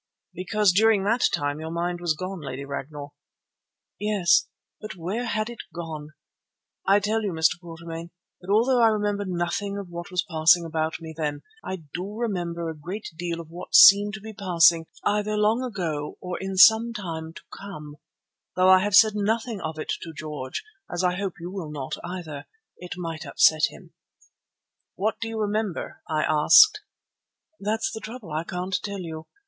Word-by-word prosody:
"Because 205 +2 +2
during 210 +1 +4
that 230 +5 +3
time 145 +1 -1
your 160 0 -5
mind 175 +1 -2
was 170 -3 0
gone, 185 +1 -5
Lady 140 -1 -6
Ragnall." 145 +1 -7 0.9
"Yes, 205 -4 +3 0.3
but 215 -2 -7
where 190 +8 -3
had 215 -1 -1
it 240 -1 -9
gone? 155 -2 -7 0.7
I 200 +1 +6
tell 215 +2 0
you, 205 -3 -2
Mr. 160 +1 +2
Quatermain, 165 0 -8 0.3
that 180 - -13
although 240 +4 +4
I 230 - +7
remember 205 -2 0
nothing 185 +3 -2
of 200 -3 -7
what 175 +2 -7
was 180 -2 -1
passing 165 0 +4
about 160 0 -2
me 160 -1 -8
then, 150 -2 -3 0.2
I 185 -3 -5
do 190 +4 -5
remember 175 -7 -2
a 160 - -4
great 180 +8 -6
deal 170 0 -4
of 165 -1 -10
what 175 +2 -5
seemed 205 +1 +8
to 215 - -9
be 220 +1 -8
passing 170 -5 +4 0.2
either 210 +1 0
long 215 +3 +2
ago 170 -12 -4
or 180 -1 -5
in 190 0 -4
some 225 +4 +7
time 165 -7 -5
to - - -10
come, 150 -7 -9 0.6
though 185 0 +4
I 185 - +8
have 205 +1 +1
said 215 +1 +7
nothing 220 +1 -1
of 160 -1 -5
it 155 - -3
to 165 - -8
George, 150 -4 -6 0.3
as 175 +1 -2
I 180 0 +2
hope 195 -1 -3
you 175 +2 -7
will 185 -5 -6
not 145 -3 -5
either. 170 -5 -7 0.3
It 180 0 -7
might 165 -2 -5
upset 155 -2 +4
him." - - -15 1.0
"What 215 +3 -1
do 230 - -2
you 225 0 -4
remember?" 210 -3 -2
I 155 -1 +1
asked. 415 - +6 0.8
"That's 220 +2 -1
the - - -5
trouble; 220 -5 -9
I 155 +2 -2
can't 180 +2 -3
tell 200 -2 -5
you. 160 -2 -7
180 Hz, 175 wpm, -25 LUFS, 160-210 Hz, 1.0 s, seemed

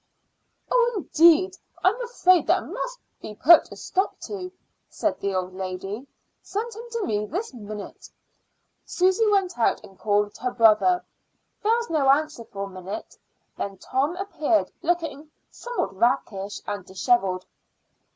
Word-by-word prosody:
"Oh, 485 -1 +3
indeed! 340 +1 +4 0.3
I'm 410 +7 +3
afraid 370 -8 +3
that - - +2
must - - -5 0.2
be 210 - -8
put 320 +9 +6
a - - -8
stop 380 +2 -2
to," 370 -3 -6 0.4
said - - -1
the 200 -1 -2
old 185 0 -2
lady. 190 +6 -5 0.3
"Send 450 +3 -4
him 455 +3 -9
to 460 -3 -1
me 210 0 -1
this 370 - -4
minute." 210 -3 -9 0.7
Susy 375 +5 +2
went 385 -8 +1
out 230 - +2
and 195 -3 -15
called 205 0 +1
her 250 - -1
brother. 240 +10 +4 0.6
There 440 +2 +3
was 470 -4 -3
no 285 -4 +2
answer 295 -4 +2
for 200 -2 -6
a 200 - -5
minute; 190 +3 -7 0.4
then 195 -1 -4
Tom 275 - -1
appeared, 345 -5 0
looking 320 -4 -2 0.2
somewhat 485 - -4
rakish 205 -3 0
and 205 -1 -4
disheveled. 190 -1 +1
290 Hz, 140 wpm, -25 LUFS, -, 0.7 s, put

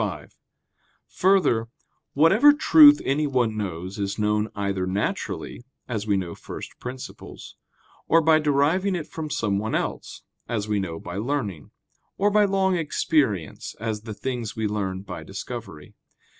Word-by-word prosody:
5: - - -5 0.7
Further, 180 -13 +2 0.5
whatever 195 - +6
truth 295 0 +7
anyone 135 -6 +1
knows 95 -2 -5
is 100 0 -2
known 105 0 0
either 100 -2 -2
naturally, 100 +4 -3 0.2
as 110 -3 -3
we 100 -2 +2
know 90 -3 -4
first - - -9
principles; 125 +1 -9 0.5
or 165 - +5
by 160 -1 +4
deriving 155 +7 +2
it 165 -4 -4
from 155 -1 -6
someone 105 -4 -1
else, - - -4 0.3
as 110 -3 -2
we 105 -1 0
know 85 -4 -4
by 90 +2 -7
learning; 105 - -3 0.5
or 205 +1 +2
by 210 0 +4
long 190 -1 +1
experience, 150 - -1
as 110 -1 -3
the 110 -1 -7
things 120 -2 -4
we 110 -1 -2
learn 100 -3 -2
by - - -7
discovery. - - -8
115 Hz, 140 wpm, -24 LUFS, 100-160 Hz, 0.7 s, truth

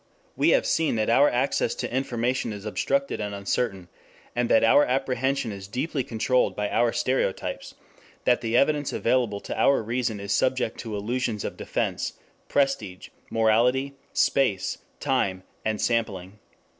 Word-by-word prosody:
We - - +3
have - - +4
seen 160 -6 +1
that 110 0 +1
our 140 +5 +6
access 130 +3 0
to 125 -1 -4
information 125 -2 -1
is 100 0 -9
obstructed 275 - -1
and 105 -1 -3
uncertain, 100 -2 -2 0.5
and 120 -1 0
that 115 - +5
our 115 +6 +6
apprehension 130 -1 0
is 100 -1 -8
deeply 130 +5 -2
controlled 125 +2 +1
by 105 0 -2
our 120 -1 +3
stereotypes; 125 -7 -2 0.5
that 125 - +3
the 115 0 +1
evidence 145 +1 +2
available 115 -4 +1
to - - -5
our 140 -4 +3
reason 115 -1 -2
is 100 +1 -2
subject 130 0 0
to 110 -3 -5
illusions 110 0 -2
of - - -4
defense, - - -2 0.4
prestige, 125 -10 0 0.2
morality, 120 +5 +2 0.2
space, 110 -9 +1 0.2
time, 95 -1 0 0.2
and 110 -1 -1
sampling. 105 -4 -1
120 Hz, 145 wpm, -25 LUFS, 105-130 Hz, 0.5 s, our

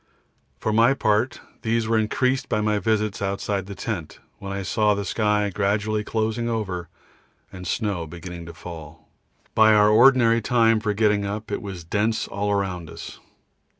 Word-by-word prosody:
For 110 - -2
my 115 +5 +4
part 110 +1 +1 0.2
these 115 0 0
were 115 - +1
increased 125 +4 0
by 105 - +1
my 105 -1 +1
visits 105 -2 0
outside 100 -1 -2
the 100 - -7
tent, 95 -9 -5 0.2
when 100 -1 -6
I 100 0 -3
saw 105 +2 +2
the 100 0 -3
sky 105 0 +1
gradually 105 +2 0
closing 110 +2 -1
over 95 -7 -3 0.6
and 90 -1 -8
snow 95 -4 -2
beginning 85 +1 -8
to 85 - -8
fall. 80 -2 -10 0.4
By 110 -1 +6
our 105 0 +5
ordinary 115 0 +5
time 115 -2 +3
for 105 -1 -1
getting 105 -1 +2
up 105 +2 -5
it - - -2
was 95 -4 -7
dense 105 +6 0
all 100 +1 -2
around 95 -5 -2
us. - - -9
105 Hz, 165 wpm, -24 LUFS, 95-110 Hz, 0.6 s, By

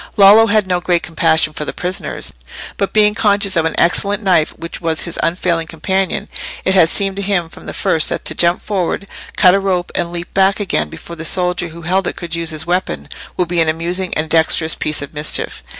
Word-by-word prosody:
Lollo 210 +3 +7
had 215 -1 +2
no 180 -1 0
great 175 -1 +1
compassion 160 -2 +2
for 150 - -4
the - - -5
prisoners, 180 +1 -3 0.4
but 195 - -1
being 210 -1 +4
conscious 205 -2 +1
of 165 -1 +2
an 160 - -1
excellent 200 +4 +1
knife 180 -5 +3
which 165 - -7
was 165 -2 0
his 170 - -6
unfailing 170 -1 0
companion, 190 +4 -2 0.4
it 190 - +2
had 180 -4 +5
seemed 195 0 0
to - - -2
him 190 -4 -1
from - - -13
the - - -4
first 160 - 0
that - - -3
to - - +3
jump 170 +2 +1
forward, 195 -1 -2 0.3
cut 180 -2 +6
a 195 - +3
rope, 185 -2 -1
and 170 -1 -2
leap 175 0 -6
back 195 +1 +3
again 120 - -1
before 170 - -10
the 165 - -7
soldier 180 +1 +1
who 170 +1 -11
held 185 +2 0
it - - -3
could 170 -1 -7
use 170 -1 -1
his 155 -1 -2
weapon, 180 +2 -2 0.3
would 180 - +1
be 175 -1 +1
an 160 - +2
amusing 175 +3 -2
and 155 +1 -1
dexterous 160 0 +3
piece 150 -1 -2
of 145 - -9
mischief. 150 +1 -1
175 Hz, 220 wpm, -16 LUFS, 165-195 Hz, 0.4 s, Lollo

